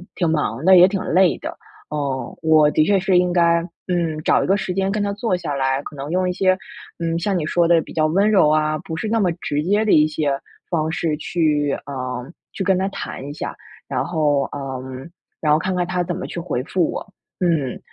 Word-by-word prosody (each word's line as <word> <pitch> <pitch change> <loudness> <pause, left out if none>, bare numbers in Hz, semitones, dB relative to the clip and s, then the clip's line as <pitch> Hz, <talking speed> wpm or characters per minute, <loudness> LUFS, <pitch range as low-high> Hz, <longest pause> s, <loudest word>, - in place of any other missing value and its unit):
挺 170 -3 0
忙 150 -3 -1
的， 190 0 +8
也 180 - +9
挺 195 -1 -2
累 185 +1 +3
的。 - - -7 0.3
呃， 140 -3 -3
我 155 -2 +5
的 155 - +3
确 195 +3 +3
是 185 -1 +2
应 180 0 +1
该 170 -1 +3 0.3
嗯， 170 -4 -1
找 - - +3
一 - - -2
个 195 - +3
时 185 -2 -3
间 195 +1 0
跟 210 - -1
他 200 0 -1
坐 205 -3 -1
下 165 -5 -4
来， 135 0 0
可 - - -9
能 140 +1 -6
用 185 +2 +1
一 - - -1
些 185 0 +2 0.4
嗯， 165 0 -1
像 195 +1 0
你 155 - -2
说 170 +2 +2
的， 170 -1 +5
比 - - -12
较 155 -1 +2
温 195 +7 +2
柔 185 -8 +5
啊， 155 0 +2
不 160 - -6
是 215 - -3
那 225 +1 +1
么 185 -4 +2
直 150 -3 -3
接 205 +5 +2
的 - - +2
一 155 0 +5
些 150 -2 -1 0.4
方 160 -2 0
式 165 -2 -1
去， 150 -3 0
呃 130 -1 -5 0.2
去 195 - -3
跟 190 - +3
他 190 +1 0
谈 135 - -6
一 - - -5
下。 150 - -5 0.3
然 - - -1
后 150 -4 +1
呃， 135 -2 -5 0.6
然 150 -2 +2
后 155 - +3
看 185 +2 -2
看 180 -1 0
他 180 -1 -1
怎 175 0 -3
么 - - -5
去 - - -5
回 160 -8 -2
复 170 +3 0
我， - - -6 0.3
嗯。 160 -8 0
165 Hz, 250 characters per minute, -21 LUFS, 150-185 Hz, 0.6 s, 也